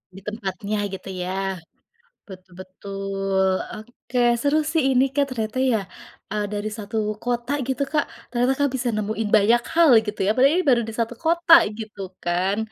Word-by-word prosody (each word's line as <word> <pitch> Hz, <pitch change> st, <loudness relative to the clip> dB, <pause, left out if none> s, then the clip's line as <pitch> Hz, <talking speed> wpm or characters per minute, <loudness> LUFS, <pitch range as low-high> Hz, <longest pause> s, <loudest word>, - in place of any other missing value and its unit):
Di -, -, -9 dB
tempatnya 205 Hz, -1 st, -4 dB
gitu 190 Hz, -1 st, -8 dB, 0.2 s
ya. 180 Hz, -, -4 dB, 0.9 s
Betul 185 Hz, -3 st, -13 dB
betul. 195 Hz, 0 st, -2 dB, 0.3 s
Oke, 240 Hz, +3 st, -9 dB, 0.2 s
seru 290 Hz, +3 st, +2 dB
sih 315 Hz, +1 st, +1 dB
ini 255 Hz, +1 st, +4 dB
Kak 285 Hz, -1 st, +3 dB
ternyata 220 Hz, +1 st, -3 dB
ya, 250 Hz, -4 st, +2 dB, 0.5 s
eee, 210 Hz, 0 st, -1 dB
dari 205 Hz, +1 st, -3 dB
satu 210 Hz, 0 st, -6 dB, 0.3 s
kota 240 Hz, +1 st, -2 dB, 0.2 s
gitu 270 Hz, +1 st, -1 dB
Kak 305 Hz, -, 0 dB, 0.3 s
ternyata 245 Hz, +2 st, +2 dB
Kak 285 Hz, 0 st, +2 dB
bisa 250 Hz, -1 st, -2 dB
nemuin 215 Hz, 0 st, -2 dB
banyak 230 Hz, +4 st, +3 dB
hal 335 Hz, -3 st, +6 dB
gitu 210 Hz, -1 st, -5 dB
ya, -, -, +4 dB
padahal 270 Hz, +3 st, +5 dB
ini 370 Hz, -, -1 dB
baru 240 Hz, -2 st, +4 dB
di -, -, -7 dB
satu 230 Hz, +1 st, -2 dB
kota 335 Hz, +1 st, +3 dB, 0.3 s
gitu 215 Hz, -2 st, -8 dB, 0.2 s
kan. 180 Hz, +3 st, 0 dB
220 Hz, 165 wpm, -23 LUFS, 200-255 Hz, 0.9 s, hal